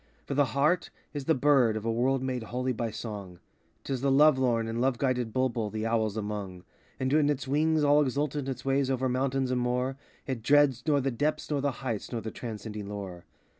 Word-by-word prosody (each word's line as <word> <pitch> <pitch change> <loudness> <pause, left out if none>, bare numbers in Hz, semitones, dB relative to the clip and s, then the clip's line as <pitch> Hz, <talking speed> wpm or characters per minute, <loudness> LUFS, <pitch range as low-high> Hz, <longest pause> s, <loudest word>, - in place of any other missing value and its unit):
For - - -3
the 145 +1 +3
heart 155 +6 +2 0.2
is 145 -2 -4
the 160 - +3
bird 130 -5 +3
of 110 - -6
a 115 - +1
world 130 +3 +1
made 130 -2 -2
holy 125 +3 -2
by 115 0 -2
song; 105 -5 -7 0.5
'T 135 - -3
is 130 - -3
the 140 - +2
love 140 0 +5
lorn 115 -3 +1
and 115 +1 -2
love 130 -1 +2
guided 125 -4 0
bulbul 120 -3 0
the 110 +1 -3
owls 110 -2 0
among. 100 -4 -5 0.4
And 130 +1 0
when 150 -1 +4
it 140 -3 -1
wings 155 +3 +2
all 145 +1 +5
exultant 145 0 -1
its 125 -2 -5
way 135 +1 +2
over 130 0 0
mountain 130 0 0
and 125 -1 +1
moor, 125 +2 -1 0.3
It 130 -4 -3
dreads 145 0 +4
nor 145 -2 +3
the 135 +1 0
depths 150 +6 -1
nor 145 -2 +1
the 140 0 +1
heights 115 -5 -3
nor 120 - -2
the 110 - -5
transcending 105 -3 -6
lure. 95 -4 -7
130 Hz, 215 wpm, -29 LUFS, 115-140 Hz, 0.5 s, love